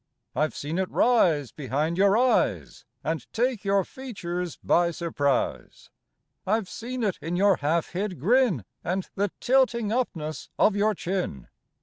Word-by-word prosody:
I've 155 +1 0
seen 155 +5 -3
it 190 - -1
rise 165 - +3
behind 150 +4 -2
your 200 +3 +4
eyes 250 +1 +1 0.2
And 160 -5 -3
take 240 -1 0
your 195 -2 +2
features 180 - -5
by 175 0 +3
surprise. 155 -5 -2 0.5
I've 215 0 0
seen 245 +5 -5
it 195 -7 -1
in 165 +4 -3
your 195 0 +4
half 155 +3 0
hid 185 -2 -3
grin 205 - +3 0.2
And 185 +2 -2
the 200 +1 0
tilting 240 -4 +2
upness 165 -11 -2
of 210 - +4
your 210 +1 +2
chin. 175 - -3
185 Hz, 140 wpm, -26 LUFS, 160-220 Hz, 0.5 s, your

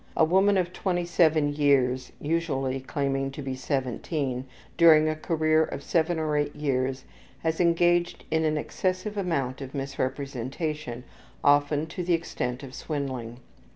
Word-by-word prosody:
A 160 - +6
woman 190 +4 +4
of 180 -1 0
27 170 -5 +2
years 130 -3 +2
(usually 140 -5 -1
claiming 135 0 -1
to 145 - -6
be 135 -1 -3
17), 130 0 -2 0.3
during 160 -2 +7
a 155 - 0
career 155 -1 +2
of 140 - -5
7 165 0 +1
or 155 -1 -1
8 145 0 0
years 130 -3 -1 0.4
has 160 +1 0
engaged 175 0 +2
in 160 0 +2
an 155 -1 +1
excessive 185 +6 -2
amount 140 -9 -1
of 135 +1 -7
misrepresentation, 135 0 -3 0.4
often 145 +1 +3
to 170 +3 -5
the 175 0 +1
extent 125 -6 -4
of 130 -2 -9
swindling. 130 -6 -4
150 Hz, 140 wpm, -27 LUFS, 135-165 Hz, 0.4 s, during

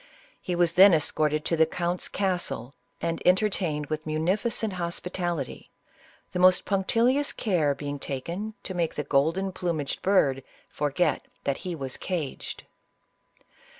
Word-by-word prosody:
He 180 - -2
was 175 -1 +2
then 190 0 +8
escorted 150 0 0
to 165 - +1
the 160 0 +4
count's 175 +2 -2
castle, 180 -9 -2 0.3
and 165 0 -2
entertained 180 -5 +2
with 155 +1 -4
munificent 195 +7 0
hospitality, 175 -3 -3 0.6
the 180 - -3
most 185 0 +5
punctilious 235 +8 +2
care 160 -9 +1
being 145 0 -5
taken 170 +12 -4
to 190 - -3
make 170 -3 -1
the 150 - -2
golden 160 +8 +1
plumaged 170 -6 -3
bird 145 -9 +3 0.3
forget 150 +4 0 0.2
that 140 - 0
he 180 -2 -5
was 135 -4 -4
caged. 165 -7 -4
170 Hz, 130 wpm, -27 LUFS, 150-185 Hz, 0.6 s, then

